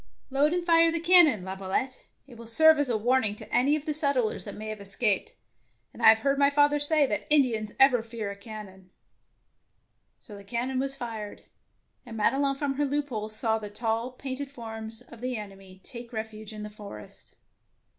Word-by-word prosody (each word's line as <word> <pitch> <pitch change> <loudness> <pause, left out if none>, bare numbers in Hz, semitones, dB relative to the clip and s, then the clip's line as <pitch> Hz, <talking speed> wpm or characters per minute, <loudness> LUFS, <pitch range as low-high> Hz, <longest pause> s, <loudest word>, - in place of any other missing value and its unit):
"Load 285 +3 +2
and 350 0 -1
fire 330 -1 +5
the 335 - -1
cannon, 330 - +6
Lavio 190 0 -7
lette; 260 +6 -3 0.2
it 260 -3 -15
will 230 0 -11
serve 315 +6 +6
as 290 -3 0
a 230 - +1
warning 225 -1 +1
to - - -12
any 275 +5 +3
of 305 -1 -5
the 305 - -1
settlers 280 -7 0
that - - -7
may 215 +1 -7
have 215 -1 -6
escaped, 205 - -1 0.6
and - - -11
I - - +8
have 220 - +7
heard 275 0 +1
my 280 0 +5
father 290 0 +3
say 290 0 +3
that - - -3
Indians 230 -8 +3
ever 265 -3 +5
fear 225 -3 -6
a - - -8
cannon.'^ 200 -3 -11 1.3
So 210 - -12
the 200 - -11
cannon 245 +5 -3
was 275 +1 -1
fired, 225 -5 -7 0.6
and 230 -3 -9
Made 210 - +2
Ion 275 0 0
from 275 0 -2
her 290 - +1
loophole 275 -7 -3
saw 220 +1 +1
the 210 -1 -7
tall, 225 +3 -2
painted 265 +2 -6
forms 225 -3 -8
of 235 -2 -15
the 250 -1 -3
enemy 195 -2 -11
take 235 -1 -5
refuge 220 -2 -7
in 215 -1 -8
the 210 - -7
forest. 205 - -10
235 Hz, 195 wpm, -27 LUFS, 215-280 Hz, 1.3 s, I